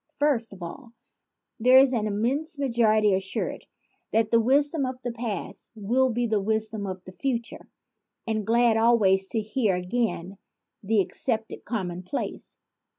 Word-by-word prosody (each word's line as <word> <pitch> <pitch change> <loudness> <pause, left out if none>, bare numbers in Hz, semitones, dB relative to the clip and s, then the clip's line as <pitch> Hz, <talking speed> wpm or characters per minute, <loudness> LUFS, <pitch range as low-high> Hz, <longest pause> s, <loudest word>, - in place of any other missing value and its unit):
First 280 -6 +1
of 195 -3 -10
all, 235 +8 -9 0.7
there 250 +3 +6
is 265 0 +6
the 240 - +1
immense 255 - -1
majority 220 -6 +3
assured 190 0 -3 0.4
that 220 -1 +1
the 230 - +5
wisdom 285 +5 +2
of 255 -1 -3
the 245 - -2
past 230 -3 -5
will 240 +5 +1
be 240 0 0
the 215 -3 +1
wisdom 220 0 -2
of 185 -1 -6
the 185 - -9
future 235 +2 -4 0.6
and 220 -1 -1
glad 230 +1 +3
always 205 -5 +3
to 225 - -1
hear 215 -2 0
again 190 0 -2 0.4
the 215 +1 +2
ac - - -5
cepted 225 -3 -3
commonplaces. 185 0 -4
225 Hz, 150 wpm, -26 LUFS, 200-245 Hz, 0.7 s, there